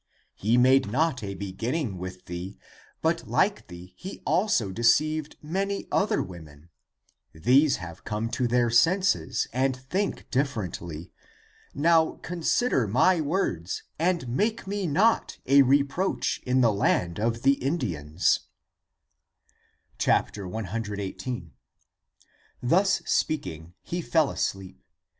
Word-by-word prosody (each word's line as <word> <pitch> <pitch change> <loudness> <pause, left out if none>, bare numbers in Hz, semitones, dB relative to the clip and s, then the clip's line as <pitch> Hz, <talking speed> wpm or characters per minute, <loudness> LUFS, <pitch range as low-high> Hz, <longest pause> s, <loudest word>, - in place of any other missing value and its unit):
He 110 +4 +1
made 130 -2 +4
not 145 0 +1
a 100 -1 -4
beginning 100 - -3
with 90 0 -7
thee, 90 +3 -6 0.5
but - - 0
like - - +1
thee 90 +1 -11
he 190 - -8
also 160 - +1
deceived 150 +8 +2
many 195 +5 -2
other 200 - +1
women. 80 -4 -12 0.6
These 135 - +4
have 85 -2 -9
come 110 +2 -3
to 125 - 0
their 120 -1 +2
senses 185 +11 +2
and 130 +1 +1
think 185 +11 -3
differently. 95 - -3 0.6
Now 160 +2 +3
consider 175 - +1
my 160 - +3
words 140 - -2 0.2
and 170 -4 +1
make 210 - -1
me 200 -1 -2
not 200 +10 +2
a 140 +2 +6
reproach 140 +7 +1
in 130 +1 +3
the 115 -3 +4
land 90 -3 +1
of 115 +2 -1
the 135 0 +3
Indians." 90 - 0 1.6
1 - - +3
1 105 +2 -4
8. 100 -1 -5 1.1
Thus 190 +10 +2
speaking, 85 - -2
he 175 +1 -3
fell 160 -3 +2
asleep. 95 -1 -4
125 Hz, 115 wpm, -26 LUFS, 95-160 Hz, 1.6 s, a